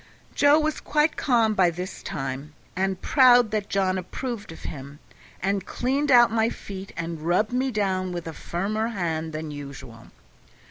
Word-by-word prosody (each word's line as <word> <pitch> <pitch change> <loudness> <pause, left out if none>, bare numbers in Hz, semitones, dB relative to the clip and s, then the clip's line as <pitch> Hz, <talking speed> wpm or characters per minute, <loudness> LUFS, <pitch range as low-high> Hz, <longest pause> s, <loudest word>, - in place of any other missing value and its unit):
Joe 285 +1 +5
was 310 0 -1
quite 300 +1 +1
calm 230 -5 +2
by 185 -4 +4
this 180 +2 -6
time, 135 +2 -5 0.2
and 190 0 -1
proud 245 -4 +6
that 210 -2 -2
John 190 -1 +1
approved 210 +2 -5
of 160 - -11
him, 140 0 -7 0.5
and 195 0 0
cleaned 275 +7 -1
out 240 -3 +7
my 225 0 +2
feet 195 -4 -8
and 165 -1 -4
rubbed 180 +8 +1
me 260 +2 +1
down 190 -5 -1
with 175 -1 -5
a 165 - -6
firmer 210 +8 -2
hand 165 -7 -2
than 155 0 -5
usual. 140 -5 -9
195 Hz, 165 wpm, -25 LUFS, 165-235 Hz, 0.5 s, out